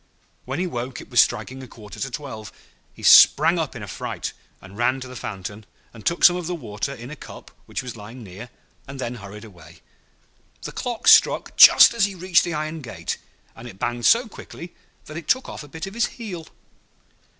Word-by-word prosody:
When 130 +2 -4
he 180 - -1
woke 125 -6 -5
it - - -13
was - - +7
striking 130 +1 -2
a 130 - -10
quarter 105 -5 -13
to 135 - -3
twelve. 120 -6 -8 0.4
He - - -16
sprang 165 +4 +7
up 155 -4 -3
in 115 - -7
a - - -8
fright, - - -5 0.3
and 95 +1 -14
ran 125 +4 0
to 130 - -7
the 125 - -11
fountain, 100 -1 -7 0.3
and 115 -2 -13
took 170 - -1
some 175 - +8
of 175 -2 -5
the 180 - -3
water 115 -3 -5
in 125 0 -9
a - - -7
cup - - -12 0.2
which - - -5
was 125 -2 -7
lying 115 +3 -11
near, 100 +5 -10 0.4
and 135 0 -9
then 120 -2 -4
hurried 105 -1 -10
away. 90 -7 -16 0.8
The - - -6
clock 240 -2 -5
struck - - +5
just - - +9
as 230 -4 +2
he 200 -1 -5
reached 180 0 +2
the 170 -3 -3
iron 155 +1 -4
gate, 95 - -6 0.4
and 115 - -11
it 95 - -12
banged 120 +3 -1
so 235 +1 +4
quickly 175 -4 -11 0.3
that 155 - -9
it 170 - -8
took 260 +1 +1
off - - -8
a 145 - -11
bit 160 +3 -7
of 195 - -9
his 235 +1 +1
heel. 185 -9 -8
130 Hz, 215 wpm, -22 LUFS, 110-170 Hz, 0.8 s, just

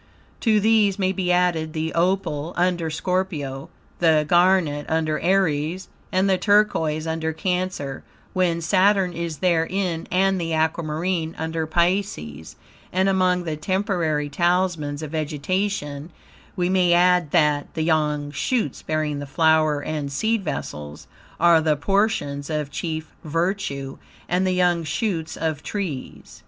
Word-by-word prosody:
To 220 -3 +3
these 210 -2 +3
may 190 -2 +1
be 190 -2 -1
added 175 -3 +1
the 160 0 -2
opal, 170 -3 0
under 175 -2 +1
Scorpio; 155 -5 -2 0.3
the 160 -3 +4
garnet, 175 -4 +3
under 160 -1 0
Aries; 175 -1 0 0.2
and 185 +1 +2
the 190 -1 +2
turquoise, 165 -7 +2
under 160 0 -2
Cancer, 180 -6 -2 0.3
when 175 -3 +1
Saturn 190 +1 +3
is 170 -2 -4
therein; 170 0 0
and 190 0 +2
the 165 -1 -1
aquamarine, 160 +1 -1
under 160 0 -2
Pisces; 170 - -1 0.4
and 190 +2 +2
among 185 -2 +2
the 160 -2 -3
temporary 170 -3 -1
talismans 165 -2 0
of 150 - -6
vegetation 155 0 -2 0.5
we 180 -2 0
may 180 -2 +3
add 180 -2 +4
that, 150 -3 +2
the 160 - 0
young 150 -2 0
shoots, 180 - -1
bearing 155 -2 -2
the 145 - -6
flower 155 0 +3
and 145 -1 -4
seed 220 +8 0
vessels, 75 - -6 0.3
are 170 -1 +5
the 155 -1 +2
portions 155 -5 0
of 150 -2 -2
chief 160 0 -4
virtue, 160 -4 -2 0.3
and 185 +2 +1
the - - +2
young 175 -2 +2
shoots 160 +1 -2
of 155 -2 -2
trees. 175 -11 -6
165 Hz, 135 wpm, -23 LUFS, 155-185 Hz, 0.5 s, are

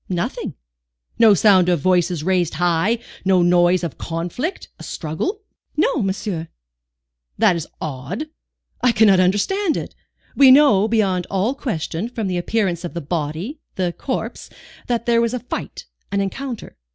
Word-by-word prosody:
"Nothing." 175 -2 -3 0.6
"No 220 -3 +7
sound 185 -3 +5
of 175 -2 +2
voices 175 -1 +1
raised 180 -2 +1
high, 175 +6 +1 0.3
no 185 -2 +3
noise 175 +1 +3
of 170 - -2
a - - -35
conflict, 175 - -4
a - - -9
struggle?" 270 - -4 0.3
"No, 305 -3 +2
monsieur." 190 -4 -3 0.9
"That 180 - +4
is 165 - -4
odd. 155 - -5 0.6
I 250 -1 +3
cannot 210 -4 +5
understand 290 - +1
it. - - -6 0.4
We 275 -2 +7
know, 255 -7 +6
beyond 195 -5 +1
all 200 +6 0
question, 210 - -3
from 230 -3 -4
the 180 -2 -1
appearance 185 -3 -1
of 175 - -6
the - - -1
body, 165 - -4 0.2
the 180 -2 -1
corpse, 260 - -5 0.4
that 235 -1 -1
there 235 -1 +3
was 235 +1 0
a - - -2
fight, 245 - -6 0.3
an 200 - 0
encounter. 235 +5 -5
190 Hz, 150 wpm, -20 LUFS, 175-235 Hz, 0.9 s, No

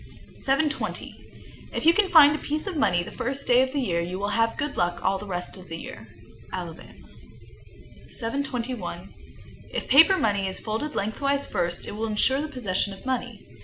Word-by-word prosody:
_ - - -16 0.3
720. 290 +3 -1 0.6
If - - -3
you 330 - +8 0.2
find 300 -4 +8
a - - -4
piece 305 +3 -2
of 390 -4 -4
money 175 - +2
the - - -9
first 270 +3 -3
day 245 +1 +5
of 260 0 +1
the 285 - -1
year, 175 -10 0
you 180 +2 -4
will 200 +1 -2
have 225 +2 +1
good 295 -1 -2
luck 175 0 -1
all 195 - +2
the 205 - -8
rest 180 0 -4
of 185 -1 -12
the 165 - -5
year. 110 -8 -9 0.4
Alabama. 175 -2 -6 1.2
721. 230 -7 -3 0.6
If - - -4
paper 325 +8 +7
money 200 - +1
is 190 - -4
folded 225 +8 -3
lengthwise 275 +7 0
first, 175 -1 -2
it - - -6
will 220 +2 -3
insure 260 +6 +2
the 310 - -3
possession 205 -8 -1
of 195 - -13
money. 245 -4 -3
225 Hz, 185 wpm, -26 LUFS, 185-280 Hz, 1.2 s, you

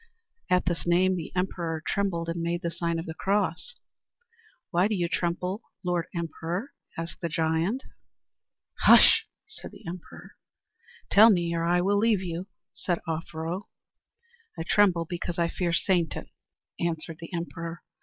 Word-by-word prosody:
At 180 0 +3
this 175 -1 -2
name 185 +2 +4
the 165 -3 -5
emperor 170 -3 -2
trembled 185 -5 0
and 170 0 -2
made 170 +1 -1
the 170 - -1
sign 170 0 -1
of 165 - -4
the 160 - -5
cross. 195 - -1 1.0
"Why 180 +2 +3
do 215 - 0
you 175 -3 0
tremble, 180 +4 -1 0.2
Lord 175 -2 0
Emperor?" 170 - -3 0.2
asked 165 0 -5
the 170 - -1
giant. 165 - 0 1.0
"Hush!" 445 0 +8 0.2
said 435 - -9
the - - -15
emperor. 175 0 -9 0.7
"Tell 220 +3 +9
me, 170 -5 +2
or 165 0 0
I 175 +1 +3
will 200 +2 +2
leave 215 -3 +3
you," 175 +1 -4 0.3
said 175 -2 -1
Offero. 165 +3 -4 0.9
"I 165 - -2
tremble 175 -2 +3
because 175 0 -4
I 170 -1 +2
fear 175 -1 -1
Satan," 170 -1 0 0.5
answered 165 0 -2
the 165 - -9
emperor. 170 -1 -5
175 Hz, 145 wpm, -27 LUFS, 165-185 Hz, 1.0 s, Tell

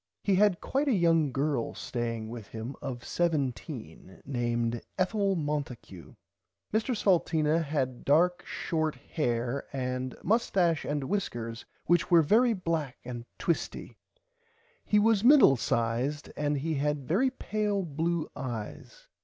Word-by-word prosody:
He 200 - +2
had 195 -1 +3
quite 280 +2 0
a 270 - +3
young 165 -6 +3
girl 140 -3 -1
staying 115 -2 -3
with 115 -3 -8
him 115 +4 -6
of 125 -4 -5
17 130 - -3
named 120 -3 -1 0.2
Ethel 195 +1 +1
Monticue. 145 - -5 0.6
Mr 225 +2 +1
Salteena 165 -5 +2
had 135 -5 -2
dark 175 +5 +3
short 160 -2 -2
hair 120 -2 -2
and 130 -1 -3
mustache 185 -7 +2
and 145 -1 -1
wiskers 120 - -3 0.2
which 170 -2 +2
were 170 -2 +6
very 230 +9 +4
black 165 - -2
and 120 -1 -6
twisty. 170 - -2 0.9
He 210 - +2
was 215 -1 +4
middle 265 - +7
sized 120 +5 -1
and 145 0 0
he 160 +4 -2
had 145 -2 -1
very 220 +12 +3
pale 210 -5 -1
blue 165 +1 -1
eyes. 130 - -7
150 Hz, 130 wpm, -29 LUFS, 125-180 Hz, 0.9 s, middle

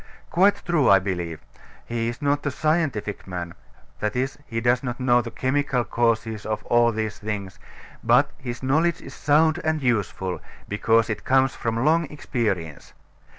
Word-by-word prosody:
Quite 195 +4 +3
true, 170 -6 +3
I 100 - +8
believe. 90 -4 -3 0.4
He 115 -1 -2
is 120 +4 -5
not 145 0 +1
a - - +3
scientific 145 -10 -1
man 90 -2 -5 0.5
that 105 +1 -2
is, 135 +3 -2
he 115 - -2
does 120 +1 +2
not 120 -2 -4
know 120 -1 +4
the 120 - -6
chemical 130 0 0
causes 115 -1 0
of 110 0 -3
all 120 0 +4
these 110 -1 -3
things; 105 -3 -5 0.4
but - - +4
his 120 0 -6
knowledge 155 +6 +2
is 135 - -10
sound 160 +3 +3
and 160 0 +1
useful, 100 -6 -1 0.3
because 115 +2 +2
it 110 -2 -4
comes 135 0 +3
from 115 +2 -2
long 165 +2 +3
experience. 105 - -3
120 Hz, 160 wpm, -24 LUFS, 105-140 Hz, 0.5 s, I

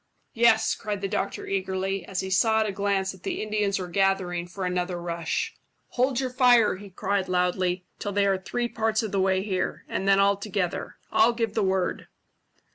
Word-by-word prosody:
"Yes," 225 -1 +4
cried 205 -2 -4
the 195 - -1
doctor 200 0 -3
eagerly, 195 0 -2
as 190 -2 -2
he 190 - -5
saw 220 +3 +3
at - - +1
a 210 - -1
glance 195 -1 0
that 190 - -14
the - - -3
Indians 210 -2 0
were 185 - -4
gathering 180 -1 0
for 185 +1 -5
another 180 0 -1
rush. 170 -1 -2 0.4
"Hold 255 0 +1
your 260 -1 -2
fire," 245 -5 +4
he 200 +1 -11
cried 195 +1 -1
loudly, 180 0 0
"till 205 - -3
they 200 0 +2
are 195 -1 +2
three 240 +5 -2
parts 220 -1 0
of 215 - -3
the 195 - +1
way 190 0 +2
here, 185 -3 -2
and 195 - -3
then 195 0 +5
all 200 0 +4
together. 200 -3 -3
I'll 365 -10 +4
give 230 -2 -1
the 220 - 0
word." 190 -2 0
195 Hz, 200 wpm, -26 LUFS, 185-215 Hz, 0.4 s, then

